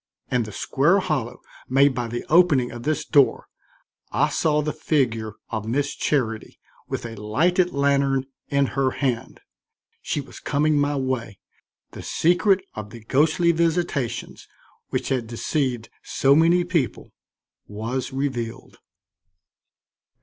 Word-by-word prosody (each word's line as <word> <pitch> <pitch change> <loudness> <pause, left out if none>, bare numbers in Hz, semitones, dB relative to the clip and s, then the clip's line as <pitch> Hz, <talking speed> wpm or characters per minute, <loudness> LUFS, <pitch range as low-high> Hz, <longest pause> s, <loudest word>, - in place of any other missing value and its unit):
In 125 - +2
the 110 -2 -5
square 145 - +2
hollow 140 - -2 0.3
made 135 +2 +4
by 120 -1 -3
the 120 +1 -5
opening 155 -7 +4
of 120 - -8
this 155 +4 -1
door, 140 -3 +3 0.7
I - - +2
saw 150 -1 +1
the 150 - -2
figure 115 -8 0 0.2
of 110 -2 -3
Miss 140 +5 0
Charity 115 -7 -1 0.3
with - - -4
a 115 -1 -6
lighted 175 - +2
lantern 140 -1 +1 0.2
in 140 0 +2
her 135 -1 +2
hand. 125 -5 -2 0.6
She - - -2
was 140 - -9
coming 150 +1 +1
my 145 0 +1
way, 130 -6 -2 0.5
the - - -9
secret 185 +3 +2
of 105 -1 -7
the 115 +2 -11
ghostly 160 +8 +3
visitations 160 -8 -1 0.4
which - - -2
had 125 -4 -1
deceived 120 0 -2
so 135 +1 +2
many 165 +4 +4
people 165 - -2 0.6
was 115 +5 -4
revealed. 130 -3 -4
135 Hz, 130 wpm, -23 LUFS, 120-155 Hz, 0.7 s, made